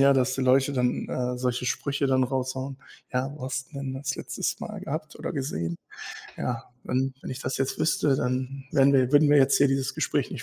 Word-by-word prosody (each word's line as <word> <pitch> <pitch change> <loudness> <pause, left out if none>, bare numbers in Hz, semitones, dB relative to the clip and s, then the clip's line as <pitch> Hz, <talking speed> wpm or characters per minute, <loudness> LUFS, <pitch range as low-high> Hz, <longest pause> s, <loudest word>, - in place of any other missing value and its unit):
ja, 140 0 +7
dass 130 -1 +2
die 135 - -2
Leute 135 +2 +4
dann, 125 -2 0
äh, 125 0 -2
solche 125 0 -1
Sprüche 140 +1 0
dann 130 -1 +4
raushauen: 130 +1 -2 0.4
„Ja, 130 +2 0
wo 130 - -7
hast 130 0 -3
du 140 - -6
denn 135 -1 -4
das 140 +1 -3
letztes - - -2
mal - - -6
gehabt 155 +1 -5
oder - - -4
gesehen?“ 85 - -2 0.6
Ja, 120 -2 -3 0.2
wenn 130 +1 0
wenn - - -6
ich 130 +1 -5
das 130 - -2
jetzt 135 0 -1
wüsste, 150 -3 +2
dann 130 +2 -2
wären 140 0 +5
wir 130 -2 +4
würden 145 0 +6
wir 145 - +7
jetzt 135 0 +5
hier 140 - +5
dieses 135 -2 0
Gespräch - - 0
nicht - - -5
130 Hz, 220 wpm, -27 LUFS, 130-140 Hz, 0.6 s, ja